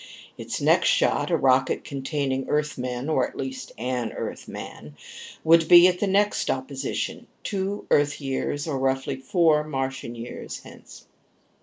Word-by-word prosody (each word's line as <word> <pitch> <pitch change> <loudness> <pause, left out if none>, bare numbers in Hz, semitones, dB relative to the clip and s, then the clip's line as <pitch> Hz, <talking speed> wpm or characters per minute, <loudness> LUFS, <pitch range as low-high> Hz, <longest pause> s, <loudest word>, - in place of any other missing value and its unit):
Its - - -5
next - - +3
shot, - - +2
a - - +2
rocket 130 0 +2
containing 135 -1 -3
Earthmen, 130 -4 -2
or 155 - +2
at - - -14
least 265 -1 -5
an 125 -1 -2
Earthman, 75 0 -7 0.5
would 165 0 +5
be 175 +1 +9
at 180 -1 0
the 205 - 0
next 205 +2 +1
opposition, 135 +1 -3 0.2
two 200 +1 -3
Earth 145 0 +3
years, 145 +2 -3
or 140 -4 -2
roughly 135 0 0
four 150 +3 +2
Martian 135 -4 -4
years, 120 +1 -7
hence. - - -14
140 Hz, 140 wpm, -25 LUFS, 130-165 Hz, 0.5 s, be